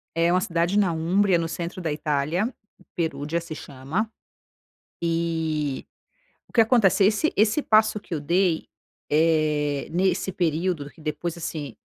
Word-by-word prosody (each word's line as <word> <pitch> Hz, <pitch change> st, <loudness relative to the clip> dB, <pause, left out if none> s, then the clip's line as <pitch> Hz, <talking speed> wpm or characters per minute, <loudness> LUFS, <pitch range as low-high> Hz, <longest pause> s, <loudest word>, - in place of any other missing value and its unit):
É 170 Hz, +1 st, +3 dB
uma 185 Hz, -, +3 dB
cidade 170 Hz, +2 st, 0 dB
na 200 Hz, -4 st, +3 dB
Umbria, 175 Hz, +3 st, +2 dB
no 165 Hz, -, -1 dB
centro 170 Hz, +2 st, -5 dB
da 160 Hz, -, -2 dB
Itália, 150 Hz, -, -1 dB, 0.4 s
Perugia 160 Hz, -1 st, -1 dB
se 165 Hz, -2 st, -7 dB
chama, 150 Hz, +14 st, -4 dB, 0.9 s
e 160 Hz, -4 st, -1 dB, 0.6 s
o -, -, -26 dB
que 230 Hz, -, +6 dB
acontece 215 Hz, -4 st, +4 dB
esse 215 Hz, +10 st, +2 dB
esse 215 Hz, +8 st, +3 dB
passo 215 Hz, -2 st, +3 dB
que 190 Hz, -, -8 dB
eu 155 Hz, -, -1 dB
dei, 170 Hz, +2 st, +1 dB, 0.4 s
eh, 150 Hz, -2 st, +2 dB
nesse 185 Hz, +2 st, +1 dB
período 165 Hz, -3 st, -1 dB
que 160 Hz, -, -21 dB
depois, 155 Hz, +3 st, -3 dB
assim, 150 Hz, -5 st, -5 dB
170 Hz, 140 wpm, -25 LUFS, 155-190 Hz, 0.9 s, que